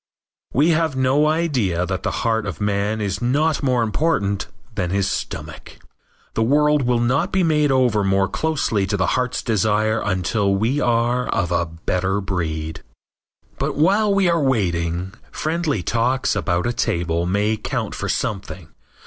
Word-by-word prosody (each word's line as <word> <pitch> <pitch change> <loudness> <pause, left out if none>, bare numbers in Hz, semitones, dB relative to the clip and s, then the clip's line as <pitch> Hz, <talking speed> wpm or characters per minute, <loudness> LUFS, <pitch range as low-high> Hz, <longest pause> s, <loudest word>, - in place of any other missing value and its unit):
We 150 +6 +3
have 160 -3 +1
no 130 +3 +3
idea 130 - 0
that 95 -1 -3
the - - -1 0.2
heart 110 -2 +1
of 95 - -5
man 105 +1 0
is 100 0 -2
not 145 +6 +1
more 125 -4 +2
important 105 -5 0 0.3
than 90 - -2
his 100 +1 0
stomach. - - -5 0.6
The - - -1
world 150 +5 +3
will 120 -1 +1
not 125 +4 +1
be 190 -1 +2
made 150 -3 +2
over 125 -6 +2
more 95 0 +2
closely 115 -6 0
to 100 - -1
the 95 - +1
heart's 125 -1 -1
desire 110 0 +1
until 100 +1 0
we 115 +8 0
are 120 +1 +1
of 90 -3 0
a 85 -1 +1
better 90 +4 -1
breed. 80 -5 -3 0.8
But - - -1
while 200 +8 +3
we 195 -2 +3
are 170 -2 +2
waiting, 90 - 0 0.2
friendly 155 - -1
talks 120 +4 +1
about 85 -2 0
a 120 - 0
table 85 -5 -1
may 105 +4 +1
count - - -3
for - - -4
something. 95 -5 -3
110 Hz, 155 wpm, -21 LUFS, 95-140 Hz, 0.8 s, We